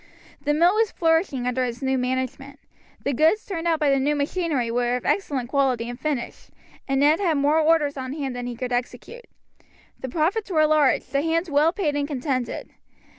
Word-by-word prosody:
The 295 +1 0
mill 345 +4 +4
was 440 0 +2
flourishing 325 -6 +1
under 250 +1 0
its 245 +2 -4
new 265 0 +1
management. 260 +2 -3 0.4
The 280 - 0
goods 320 - +2
turned 340 -4 -4
out 325 -2 +2
by 295 -3 +2
the 275 - +3
new 290 +3 +1
machinery 290 -4 -1
were 245 +1 0
of 250 - -5
excellent 270 -11 -1
quality 260 -4 +1
and 245 +1 -7
finish, 290 -6 -4 0.4
and 270 -1 +1
Ned 295 +3 +4
had 340 -7 +1
more 290 +3 +3
orders 305 -3 +2
on 260 0 -4
hand 275 -4 -4
than 245 0 -5
he 245 - -5
could 250 +1 -4
execute. 250 - -5 0.7
The 260 - -5
profits 355 - 0
were 310 -4 +3
large, 300 -3 +3
the 275 +2 -1
hands 330 +2 -1
well 295 +3 +4
paid 330 -6 -1
and 285 0 -1
contented. 255 -4 -3
285 Hz, 195 wpm, -24 LUFS, 255-320 Hz, 0.7 s, mill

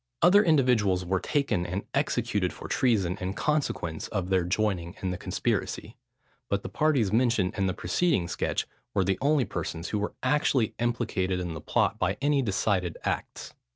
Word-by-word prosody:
Other 200 +4 +7
individuals 125 - +3
were 95 +1 +1
taken 140 - 0
and 90 +3 -3
executed - - 0
for - - -9
treason, 100 -8 +1
in 95 +2 -3
consequence 135 - -1
of 95 -3 -3
their 95 -2 +3
joining 90 -2 -1
in 95 - 0
the 90 - -3
conspiracy; - - -2 0.5
but 100 +1 0
the 120 - -5
parties 135 -10 +1
mentioned 115 -5 +2
in 95 -1 +1
the 95 - -1
preceding 95 - +1
sketch - - -1 0.3
were 95 - +3
the 95 0 0
only 145 -1 +3
persons, 80 +2 -4
who 105 - -1
were 105 - -3
actually 140 -6 +2
implicated 110 -6 0
in 90 -2 -3
the 80 - -7
plot - - +1
by 95 +2 0
any 145 0 +2
decided 95 -5 0
acts. - - -4
100 Hz, 170 wpm, -27 LUFS, 90-125 Hz, 0.5 s, Other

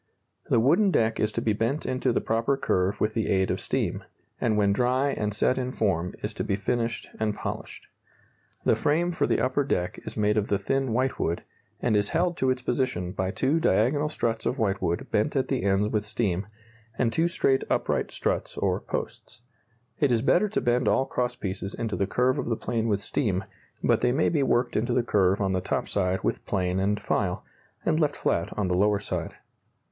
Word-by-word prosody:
The - - +4
wooden 170 - +4
deck 110 -10 +1
is 105 - +1
to 115 - -2
be 110 - +2
bent 115 +8 -1
into 130 0 0
the - - +1
proper 115 +5 +1
curve 95 -3 0
with 110 0 +1
the 110 -3 -1
aid 95 -1 +2
of - - -2
steam, - - -1 0.4
and 110 -2 +1
when 100 -1 +3
dry 130 +5 +2
and 105 -5 -2
set 125 +5 +1
in 125 0 -2
form 90 -7 -1
is - - -2
to - - -3
be 100 - 0
finished 115 +3 -2
and 110 -1 0
polished. - - -6 0.8
The - - +4
frame 170 +4 +1
for 170 - 0
the - - +2
upper 130 +3 +1
deck 90 -9 -1
is - - -7
made 105 0 +2
of 105 0 +1
the 100 - +1
thin 135 +5 -1
whitewood, 120 -8 0 0.4
and 115 -3 +2
is 105 0 +2
held 175 0 +1
to 130 - +1
its 130 -1 -1
position 120 -9 -1
by 95 0 -2
two 135 +10 +1
diagonal 145 +2 +2
struts 115 -6 -1
of 130 - -1
whitewood 95 -6 0
bent - - +1
at - - 0
the - - 0
ends 100 +2 +2
with 105 -2 0
steam, 105 -3 -1 0.5
and 115 -3 +1
two 165 +5 +2
straight 135 -5 +2
upright - - 0
struts - - -2
or - - +1
posts. - - -6 0.6
It 145 -3 +3
is 115 -1 +2
better 190 +8 +3
to 215 - -1
bend 120 +1 +1
all 135 - +3
cross 125 -1 -2
pieces 95 0 -5
into 115 -3 -2
the 100 - 0
curve 125 +4 +1
of - - -3
the 115 - 0
plane 115 -1 -1
with 100 -2 +1
steam, 100 -7 -1 0.4
but - - +3
they 125 - +3
may 140 +5 +2
be 155 -4 +1
worked 120 -2 +1
into 120 +3 +1
the 120 - +2
curve 100 -4 +2
on 95 -2 0
the 95 - 0
top - - -2
side 95 -1 0
with - - -1
plane 90 -2 0
and 100 +2 +1
file, 90 -4 -1 0.4
and 155 - +2
left 150 -3 +1
flat 85 0 0
on 105 -3 0
the 90 - 0
lower 105 +2 +3
side. 100 - -4
115 Hz, 210 wpm, -26 LUFS, 100-130 Hz, 0.8 s, The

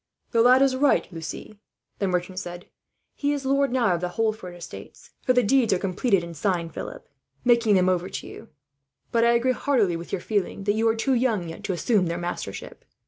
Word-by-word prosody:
"The 230 - +3
lad 255 +3 +6
is 270 -1 +2
right, 280 +2 +3
Lucie," 165 +5 -7 0.4
the 195 - 0
merchant 180 0 -2
said. 175 -1 -7 0.5
"He 285 0 -1
is 280 -2 -4
lord 275 0 +2
now 240 -7 +2
of 170 - -2
the 180 - -1
Holford 215 -5 -1
estates 175 - -11
for 255 - +2
the 250 0 +3
deeds 235 -1 +3
are - - +2
completed 195 +1 +1
and 170 -1 -8
signed, 170 -1 -1
Philip, - - -7 0.4
making 235 -4 +4
them 185 -1 +3
over 185 0 0
to - - -6
you. 225 - -11 0.6
But 230 -1 +3
I 235 - +5
agree 240 +2 +2
heartily 245 - +1
with 170 +1 -7
your 195 - -1
feeling 200 -1 -2
that 205 +1 +2
you 225 +1 +1
are 225 - +3
too 260 +4 0
young, 230 -8 +1
yet, 165 - -9
to 190 - -1
assume 185 +2 +1
their 170 +1 -2
mastership. 175 0 -6
210 Hz, 210 wpm, -25 LUFS, 180-245 Hz, 0.6 s, lad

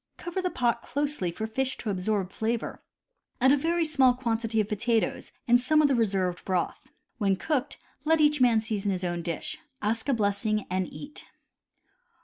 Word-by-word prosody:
Cover 350 +2 -3
the 365 - 0
pot 235 -6 0
closely 285 -9 -1
for 220 +6 -4
fish 260 +4 -1
to 215 - -3
absorb 195 0 -1
flavor. 225 +2 -2 0.6
Add 260 +1 +5
a - - +6
very 330 +3 +1
small 270 -5 +4
quantity 230 -2 -1
of 210 - +1
potatoes, 225 +1 0 0.2
and 245 +1 +5
some 305 +5 +3
of 305 - +6
the 275 - +2
reserved 195 -6 0
broth. 185 -2 -2 0.3
When 195 -3 +2
cooked, 290 - -2 0.3
let 320 +1 +3
each 295 -2 +4
man 235 -3 +5
season 215 -2 -2
his 185 -1 -3
own 175 -1 -1
dish. 170 -1 -4 0.2
Ask 225 +5 -1
a - - +4
blessing 210 0 0
and 185 -1 -1
eat. 295 +1 -9
230 Hz, 175 wpm, -27 LUFS, 200-275 Hz, 0.6 s, a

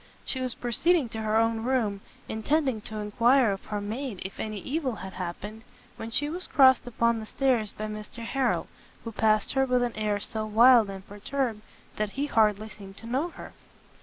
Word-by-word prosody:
She 260 - -2
was 255 -2 -2
proceeding 275 +4 +1
to 220 0 -5
her 215 0 0
own 225 0 +2
room, 230 -6 0 0.3
intending 260 +1 0
to 220 - -6
enquire 230 +3 +3
of 195 - -5
her 210 - -3
maid 220 +1 -4
if 190 - -7
any 215 -1 -3
evil 265 - -2
had 190 -2 -8
happened, 195 +5 -6 0.3
when 225 - -6
she 275 +5 +2
was 350 +4 -2
crossed 260 -2 +5
upon 235 -1 +1
the 220 - -6
stairs 245 -6 +1
by 215 - -6
Mr 215 +2 -7
Harrel, 265 +1 0 0.4
who 230 - -5
passed 215 -1 +2
her 270 0 +3
with 250 -2 +2
an 240 - -2
air 210 -1 0
so 215 +1 -3
wild 225 +1 +6
and 195 -1 -8
perturbed, 220 +2 -3 0.4
that 210 -1 -2
he 280 +2 -1
hardly 215 -5 +2
seemed 195 -1 -12
to - - -10
know 265 +9 -1
her. - - -11
225 Hz, 195 wpm, -27 LUFS, 210-260 Hz, 0.4 s, wild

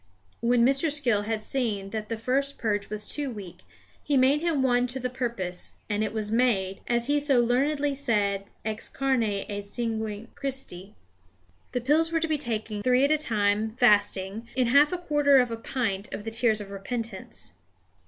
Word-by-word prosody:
When 235 0 +3
Mr. 275 +4 +2
Skill 245 -8 +2
had 220 -1 -1
seen 210 -7 -2
that 215 -1 -4
the 230 - -2
first 275 +5 0
purge 205 -3 -1
was 210 0 -5
too 290 -2 -1
weak, 200 -7 -8 0.4
he 290 -2 +1
made 270 +3 +4
him 325 -5 +1
one 245 -1 +3
to 255 +2 -2
the 250 0 -3
purpose; 230 -8 -4 0.2
and 205 +1 +1
it 215 - -1
was 215 -1 -2
made, 210 -6 +1
as 235 -1 +1
he 290 +2 +2
so 285 -3 +3
learnedly 280 +4 +2
said, 205 -7 0 0.2
ex 220 0 -3
carne 270 -2 +1
et 205 -1 -2
sanguine 220 -1 -3
Christi. 255 -9 -5 0.8
The 250 - 0
pills 310 +6 +2
were 330 - +2
to 325 - 0
be 310 -2 0
taken 220 -5 -3
three 255 +4 +4
at 285 - +1
a 310 - +4
time, 215 -4 0
fasting, 205 -2 +2
in 255 -2 +2
half 285 +4 +6
a 360 - -1
quarter 295 -5 +3
of 250 -2 +3
a - - -1
pint 225 -4 -3
of 205 - -5
the 225 - -5
tears 225 -1 +2
of 200 -1 -9
repentance. 200 - -5
235 Hz, 185 wpm, -27 LUFS, 210-270 Hz, 0.8 s, half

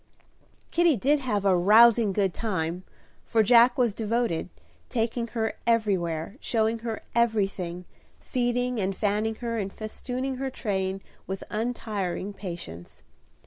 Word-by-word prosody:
Kitty 340 -3 +4
did 285 +7 +2
have 210 -7 -1
"a 190 -2 +5
rousing 220 +4 +6
good 195 -2 +1
time;" 180 -5 -2 0.4
for 225 -1 +2
Jack 240 +2 +6
was 240 -5 +2
devoted, 220 -6 -1 0.4
taking 235 0 -1
her 220 0 0
everywhere, 195 -5 0
showing 225 0 0
her 225 -1 -5
everything, 195 -6 0 0.3
feeding 245 -1 -1
and 190 0 -1
fanning 210 +2 0
her, 230 -1 -1
and 195 -1 -3
festooning 250 +5 -4
her 270 +1 -2
train 195 -6 -2 0.2
with 190 0 -4
untiring 210 -4 -3
patience. 170 - -8
220 Hz, 125 wpm, -26 LUFS, 190-235 Hz, 0.4 s, rousing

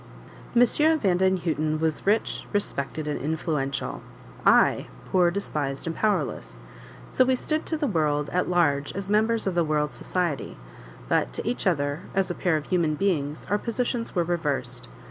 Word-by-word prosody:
M. 240 - +7 0.3
Vandenhuten 180 - +1
was 160 +3 -1
rich, 215 +3 +1
respected, 155 -6 -2
and 150 - -2
influential; 145 -3 -2 0.5
I, - - +5 0.2
poor, 180 -2 +4
despised 150 -7 -3
and 165 -1 -3
powerless; 215 -1 -1 0.5
so 255 - +3
we 260 0 +2
stood 310 +5 -2
to 320 - -1
the 300 - -1
world 150 - 0
at 180 0 0
large 145 -5 +2
as 195 0 -4
members 220 +2 +2
of 190 - 0
the 175 -1 +2
world's 150 -4 0
society; 170 -1 -2 0.5
but - - +1
to - - -4
each 240 -4 -1
other, 145 -3 0
as 190 -1 +1
a - - -1
pair 175 -3 +1
of 150 - -5
human 170 -4 +1
beings, 155 -5 -1
our 205 +2 +1
positions 235 0 -2
were 175 - +3
reversed. 160 -5 -2
175 Hz, 160 wpm, -26 LUFS, 150-200 Hz, 0.5 s, M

